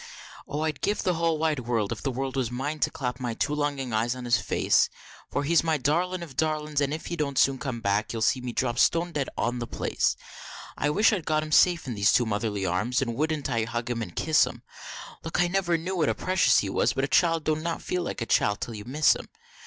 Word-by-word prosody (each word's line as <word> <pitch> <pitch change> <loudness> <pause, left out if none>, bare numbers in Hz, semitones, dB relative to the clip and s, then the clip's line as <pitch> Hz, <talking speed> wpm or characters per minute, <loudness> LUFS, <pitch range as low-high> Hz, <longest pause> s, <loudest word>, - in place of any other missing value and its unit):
Oh 150 - -3
I'd 155 -3 -2
give 210 - 0
the 180 - +2
whole 165 -1 +1
wide 155 -2 0
world, 115 -4 -1
if - - -4
the 135 - -1
world 135 +1 -3
was 130 -4 0
mine, 140 +5 -3
to - - +2
clap 125 -1 -4
my 120 -3 -3
two 145 - -1
longin 145 -4 -2
eyes 115 +3 +1
on 125 -1 -7
his 120 0 +3
face, - - +2 0.4
For 145 - -1
he's 165 +4 +3
my 160 -2 +1
darlin 170 +6 0
of 145 -6 -10
darlins, 155 -2 0
and 140 -1 0
if 155 +1 -4
he 170 - -3
don't 145 -4 -2
soon 135 -1 +3
come 120 -2 -4
back, 105 +1 0
you'll 115 -1 -2
see 125 +3 +2
me 125 -1 -4
drop 120 0 -1
stone 170 +1 +3
dead 145 -4 -2
on 120 +1 -1
the 120 - -4
place. - - 0 0.6
I - - -2
only 150 - 0
wish 215 +3 +5
I'd 190 -6 -1
got 155 -1 +1
him 155 - -7
safe 175 +1 +4
in 125 - -4
these 100 -1 +3
two 120 - +4
Motherly 105 -2 -2
arms, 105 +9 0
and 120 -3 -3
wouldn't 155 +2 -1
I 115 -2 0
hug 120 +1 -3
him 115 -1 -2
and 90 -6 -6
kiss 155 -1 +3
him! - - -9 0.6
Lauk! 165 +1 -3
I 175 - +4
never 175 -2 +1
knew 180 +4 -4
what 155 - +2
a - - 0
precious 185 -9 +3
he 100 - +1
was - - +1
but 135 - -1
a - - +1
child 165 +3 +3
don't 155 0 0
not 165 0 -3
feel 180 - -1
like 170 - -4
a - - -5
child 105 -2 +2
till 120 - -4
you 105 -1 -8
miss 145 +5 +3
him. - - -9
140 Hz, 260 wpm, -26 LUFS, 120-160 Hz, 0.6 s, wish